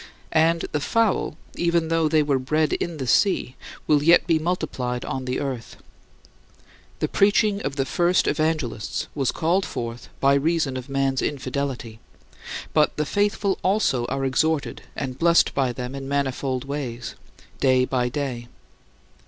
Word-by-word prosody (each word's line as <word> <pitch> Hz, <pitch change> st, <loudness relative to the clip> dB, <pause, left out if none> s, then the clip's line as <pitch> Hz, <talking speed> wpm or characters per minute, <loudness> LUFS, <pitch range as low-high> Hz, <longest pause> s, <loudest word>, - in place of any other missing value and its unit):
And 165 Hz, +1 st, +3 dB
"the 150 Hz, -, 0 dB
fowl," 225 Hz, +7 st, +1 dB, 0.2 s
even 170 Hz, -1 st, +1 dB
though 165 Hz, -1 st, +2 dB
they 155 Hz, -1 st, +3 dB
were 140 Hz, -2 st, +1 dB
bred 155 Hz, +4 st, +1 dB
in 170 Hz, -2 st, -2 dB
the 135 Hz, -, -3 dB
sea, 135 Hz, -, +2 dB, 0.3 s
will 150 Hz, -2 st, +3 dB
yet 170 Hz, +4 st, +5 dB
be 165 Hz, -2 st, +2 dB
multiplied 150 Hz, -8 st, -2 dB
on 130 Hz, -1 st, -4 dB
the 125 Hz, 0 st, -2 dB
earth. 130 Hz, -5 st, -5 dB, 1.2 s
The -, -, 0 dB
preaching 205 Hz, 0 st, +3 dB
of 135 Hz, -, -3 dB
the 135 Hz, -1 st, 0 dB
first 175 Hz, +5 st, +2 dB
evangelists 150 Hz, -8 st, -1 dB
was 135 Hz, -4 st, 0 dB
called 175 Hz, +4 st, +1 dB
forth 115 Hz, -5 st, -5 dB
by 140 Hz, 0 st, +4 dB
reason 150 Hz, -1 st, +1 dB
of 130 Hz, +1 st, -6 dB
man's 135 Hz, -1 st, 0 dB
infidelity, 130 Hz, -4 st, -3 dB, 0.7 s
but 150 Hz, -1 st, +3 dB
the 150 Hz, -, 0 dB
faithful 205 Hz, +2 st, 0 dB
also 185 Hz, -, +1 dB
are 135 Hz, +1 st, -2 dB
exhorted 155 Hz, +3 st, 0 dB
and 130 Hz, -1 st, -4 dB
blessed 170 Hz, 0 st, +4 dB
by 135 Hz, -3 st, +1 dB
them 125 Hz, +1 st, -6 dB
in 135 Hz, -1 st, -6 dB
manifold 135 Hz, -2 st, -1 dB
ways, 130 Hz, -4 st, -4 dB, 0.5 s
day 130 Hz, -1 st, +4 dB
by 125 Hz, -1 st, 0 dB
day. 125 Hz, -3 st, -4 dB
140 Hz, 150 wpm, -24 LUFS, 130-165 Hz, 1.2 s, yet